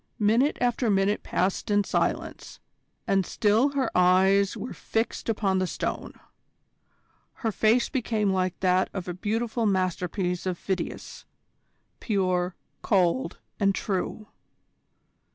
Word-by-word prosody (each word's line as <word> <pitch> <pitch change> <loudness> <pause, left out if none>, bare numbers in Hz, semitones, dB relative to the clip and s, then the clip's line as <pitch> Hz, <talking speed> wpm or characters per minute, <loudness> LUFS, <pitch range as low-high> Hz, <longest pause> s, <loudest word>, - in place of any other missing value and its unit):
Minute 230 +7 +2
after 245 -1 +1
minute 195 +1 +2
passed 185 +3 -1
in 205 0 +3
silence, - - -2 0.5
and 195 -1 +2
still 220 +9 +2
her 265 -4 -1
eyes 190 +2 +4
were - - -6
fixed 225 +1 -3
upon 195 -4 +1
the 185 - 0
Stone. - - -4 1.3
Her 225 - +2
face 220 +4 +3
became 220 -5 0
like 185 -1 -1
that 185 0 +2
of 185 -2 -4
a 180 - -3
beautiful 225 +4 -1
masterpiece 185 -1 -1
of 180 -2 -1
Phidias: 190 +1 -5 0.7
pure, 185 -4 0 0.3
cold, 195 +5 +1 0.2
and 195 -2 +2
true. 200 +2 -3
195 Hz, 115 wpm, -26 LUFS, 185-220 Hz, 1.3 s, eyes